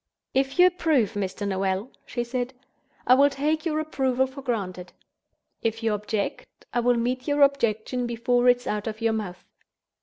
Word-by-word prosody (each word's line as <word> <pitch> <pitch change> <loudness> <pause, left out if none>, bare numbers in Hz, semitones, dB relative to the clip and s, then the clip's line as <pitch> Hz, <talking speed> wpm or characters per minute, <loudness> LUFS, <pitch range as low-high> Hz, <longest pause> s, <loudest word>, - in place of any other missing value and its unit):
"If 270 +2 0
you 360 - +8
approve, 315 - +2
Mr. 205 0 -3
Noel," 195 +4 -1 0.2
she 240 - -2
said, 250 +1 -3 0.5
"I 250 - +6
will 280 +2 +6
take 305 +4 -1
your 310 -1 0
approval 265 -4 +1
for 265 +1 -9
granted. 190 -8 -4 0.7
If 225 0 -2
you 225 -1 +2
object, 210 0 -3 0.3
I 240 - +2
will 240 0 +3
meet 250 +2 -1
your 290 0 +4
objection 245 -2 +1
before 245 +1 +2
it 245 - +6
is 245 - -16
out 210 0 -2
of 220 -1 -4
your 225 -1 +2
mouth. 200 -5 -5
245 Hz, 175 wpm, -25 LUFS, 215-270 Hz, 0.7 s, you